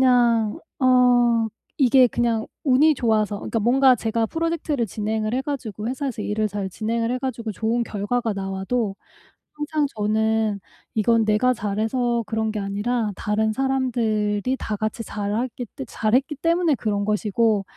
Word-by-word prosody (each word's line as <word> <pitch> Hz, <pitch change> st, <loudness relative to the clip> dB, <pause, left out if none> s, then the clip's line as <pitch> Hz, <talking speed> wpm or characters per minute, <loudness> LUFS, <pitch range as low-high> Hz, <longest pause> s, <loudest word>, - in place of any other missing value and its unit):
그냥 240 Hz, -2 st, +3 dB, 0.2 s
어 245 Hz, -2 st, +4 dB, 0.3 s
이게 260 Hz, -3 st, +5 dB
그냥 230 Hz, -1 st, 0 dB, 0.2 s
운이 295 Hz, +3 st, +5 dB
좋아서 215 Hz, -5 st, +1 dB
그러니까 225 Hz, -, -2 dB
뭔가 260 Hz, +3 st, +5 dB
제가 225 Hz, 0 st, -1 dB
프로젝트를 320 Hz, -4 st, -1 dB
진행을 215 Hz, +2 st, -2 dB
해 260 Hz, -, 0 dB
가지고 235 Hz, -7 st, -4 dB
회사에서 260 Hz, -4 st, -3 dB
일을 215 Hz, 0 st, -1 dB
잘 200 Hz, -2 st, -4 dB
진행을 230 Hz, +4 st, -1 dB
해 255 Hz, -, -1 dB
가지고 235 Hz, -4 st, -4 dB
좋은 225 Hz, +3 st, 0 dB
결과가 225 Hz, +2 st, -2 dB
나와도 195 Hz, +3 st, -2 dB, 0.6 s
항상 295 Hz, 0 st, -1 dB
저는 215 Hz, 0 st, +1 dB, 0.4 s
'이건 225 Hz, +1 st, +3 dB
내가 215 Hz, +4 st, +3 dB
잘해서 230 Hz, +2 st, -1 dB
그런 220 Hz, 0 st, -1 dB
게 215 Hz, -, -3 dB
아니라 210 Hz, +3 st, -1 dB
다른 215 Hz, 0 st, 0 dB
사람들이 240 Hz, -3 st, 0 dB
다 215 Hz, -, -3 dB
같이 215 Hz, +2 st, -3 dB
잘하기 220 Hz, +5 st, -3 dB
때 270 Hz, -, -6 dB
잘했기 255 Hz, +8 st, 0 dB
때문에 335 Hz, +1 st, +2 dB
그런 205 Hz, -3 st, -1 dB
것이고 210 Hz, 0 st, +1 dB
225 Hz, 320 characters per minute, -23 LUFS, 215-255 Hz, 0.6 s, 이게